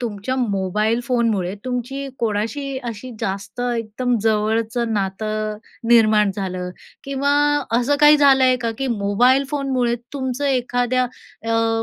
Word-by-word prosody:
तुमच्या 230 +1 -3
मोबाईल 215 0 0
फोनमुळे 225 -7 0
तुमची 255 +2 -3
कोणाशी 235 +6 -2
अशी 230 +3 -7
जास्त 200 +5 -4
एकदम 240 0 -1
जवळचं 225 +2 0
नातं 215 +1 -2 0.3
निर्माण 215 -3 +5
झालं? 185 -2 -4 0.3
किंवा 275 +1 -1 0.5
असं 285 +4 +1
काही 300 0 +8
झालं 275 -2 +5
आहे 255 0 +4
का, 235 -2 -2
की 270 - -1
मोबाईल 240 +4 +2
फोनमुळे 265 -4 0 0.2
तुमचं 260 0 -3
एखाद्या 250 -1 +1
अ, 225 -2 -2
235 Hz, 120 wpm, -21 LUFS, 215-255 Hz, 0.5 s, काही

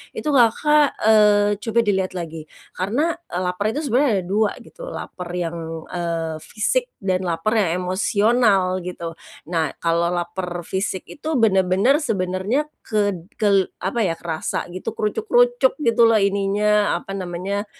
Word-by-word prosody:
itu 305 - -3
Kakak, 285 +4 +4
eee, 210 -1 +5
coba 225 +2 0
dilihat 190 -3 0
lagi, 165 -3 -6 0.2
karena, 285 - -1
eee, 180 - -3
laper 180 +3 -2
itu 300 - -2
sebenernya 255 -2 +3
ada - - -11
dua 205 +3 +1
gitu, - - -11
laper 180 - -7
yang, 170 -1 -3 0.3
eee, 165 -2 -2
fisik 475 - -1 0.2
dan 185 -1 0
laper 165 +5 -1
yang 180 -2 0
emosional 195 0 +2
gitu. 170 -2 -6 0.4
Nah, 165 -2 -1
kalau 170 +1 +1
laper 175 0 -3
fisik 190 +2 -3
itu 310 +2 -5
bener-bener 200 +1 +3
sebenernya 205 - -1 0.2
ked 205 -5 -1 0.2
kel 200 -3 +3
apa 215 +3 0
ya, 170 - 0
kerasa 165 0 -4
gitu, 185 +5 -5
krucuk-krucuk 485 - +2
gitu 230 -3 +2
loh 225 -1 +5
ininya, 200 +1 +2
apa 195 - -8
namanya, 190 +3 -3
195 Hz, 140 wpm, -21 LUFS, 180-225 Hz, 0.4 s, eee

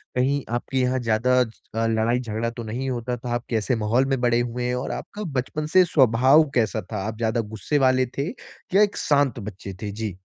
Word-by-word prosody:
कहीं 135 +3 +1
आपके 125 +2 -3
यहाँ 130 0 +1
ज़्यादा 120 +2 +2
अ, 115 -1 -3
लड़ाई 115 +2 +1
झगड़ा 115 -1 -2
तो 115 0 -7
नहीं 120 +5 -3
होता 125 0 -3
था? 120 +1 -7
आप 120 +1 -2
कैसे 115 +2 0
माहौल 115 +4 +1
में 135 -1 0
बड़े 120 -1 +3
हुए 120 0 -2
हैं, 125 0 0
और 125 - -3
आपका 210 +1 -6 0.2
बचपन 150 +4 -4
से 185 -1 +8
स्वभाव 135 0 +5
कैसा 110 -2 +1
था? 110 - -2
आप 110 0 -5
ज़्यादा 115 +1 0
गुस्से 110 - -1
वाले 130 0 +3
थे 140 +2 -1 0.5
या 200 - +6
एक 205 -1 +2
शांत 140 -5 +2
बच्चे 100 -2 -7
थे? 105 -2 -3
जी। 105 -3 -5
120 Hz, 210 wpm, -24 LUFS, 110-130 Hz, 0.5 s, से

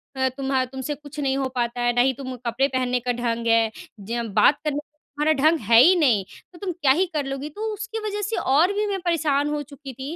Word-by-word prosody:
अ, 260 0 +1
तुम्हा 270 -1 0
तुमसे 265 +3 -5
कुछ 295 +1 -11
नहीं 270 -2 0
हो 270 -1 0
पाता 240 0 -1
है, 240 0 +2
ना 245 - +4
ही 265 +2 +3
तुम 260 0 -7
कपड़े 240 +4 +1
पहनने 255 -2 0
का 245 +1 -2
ढंग 235 -1 -1
है, 230 -1 +3 0.3
ज 230 +4 -3
बात 290 - +5
करने 300 -2 -1
का 295 - -13 0.3
तुम्हारा 300 +2 +2
ढंग 320 +1 +4
है 230 -1 +8
ही 360 +8 +6
नहीं, 240 -11 +3 0.3
तो 345 - -14
तुम 390 -3 -3
क्या 305 -6 +2
ही 350 +8 +3
कर 295 -3 -1
लोगी।" 275 +2 -4
तो 430 +7 -4
उसकी 430 +2 -5
वजह 415 0 -3
से 420 +2 -2
और 310 +9 +3
भी 415 +1 0
मैं 395 -1 -2
परेशान 295 -4 +1
हो 295 0 -2
चुकी 280 -1 -10
की 270 +6 -6
275 Hz, 250 wpm, -23 LUFS, 255-315 Hz, 0.3 s, है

